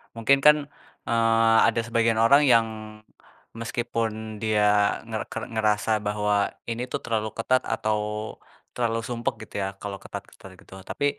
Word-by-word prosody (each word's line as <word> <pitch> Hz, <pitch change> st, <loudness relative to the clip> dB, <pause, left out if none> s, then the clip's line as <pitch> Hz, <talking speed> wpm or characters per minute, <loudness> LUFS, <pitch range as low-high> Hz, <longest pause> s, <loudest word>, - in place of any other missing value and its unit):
Mungkin 125 Hz, +5 st, +3 dB
kan, 150 Hz, 0 st, +8 dB, 0.5 s
eee, 115 Hz, -1 st, +3 dB
ada 115 Hz, +1 st, +1 dB
sebagian 115 Hz, -1 st, +1 dB
orang 140 Hz, +6 st, +6 dB
yang 115 Hz, -4 st, +5 dB, 0.9 s
meskipun 115 Hz, -2 st, -3 dB
dia 110 Hz, -1 st, +1 dB, 0.5 s
nger 110 Hz, -1 st, -3 dB
ke -, -, -7 dB, 0.2 s
ngerasa 110 Hz, 0 st, +1 dB
bahwa 105 Hz, 0 st, +1 dB, 0.2 s
ini 115 Hz, +2 st, -3 dB
tuh -, -, -3 dB
terlalu 110 Hz, -2 st, -1 dB
ketat 130 Hz, +3 st, +2 dB
atau 110 Hz, -1 st, 0 dB, 0.8 s
terlalu 115 Hz, -2 st, 0 dB
sumpek 120 Hz, -1 st, -2 dB
gitu -, -, -18 dB
ya, 95 Hz, -, -1 dB
kalau 100 Hz, -1 st, -5 dB
ketat-ketat 95 Hz, -, -10 dB
gitu. -, -, -17 dB, 0.2 s
Tapi 145 Hz, -, -2 dB
115 Hz, 140 wpm, -25 LUFS, 110-115 Hz, 0.9 s, kan